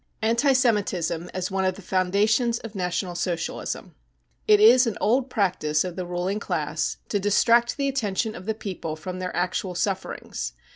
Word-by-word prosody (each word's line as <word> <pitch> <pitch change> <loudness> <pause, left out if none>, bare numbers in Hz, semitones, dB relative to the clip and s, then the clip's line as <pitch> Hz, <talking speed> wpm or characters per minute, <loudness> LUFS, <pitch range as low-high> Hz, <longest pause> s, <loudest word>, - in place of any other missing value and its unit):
Anti 235 +5 +3
Semitism 200 -9 0
as 185 +1 -3
one 190 0 0
of 185 -1 +1
the 200 - -12
Foundations 205 +6 +2
of 225 -2 -9
National 180 -1 -2
Socialism. 175 -1 -3 0.5
It 420 -1 +6
is 255 - +7
an 225 - -2
old 255 +4 +2
practice 175 -9 +1
of 180 -2 -5
the 180 0 -4
ruling* 180 +3 -2
class 155 -5 -2
to 205 - 0
distract 230 +5 +3
the 280 -1 0
attention 220 -5 -1
of 185 -1 -10
the 220 - 0
people 185 -7 -5
from 180 +4 -6
their 185 0 -4
actual 180 +1 -1
sufferings. 190 +1 -3
195 Hz, 165 wpm, -25 LUFS, 180-230 Hz, 0.5 s, is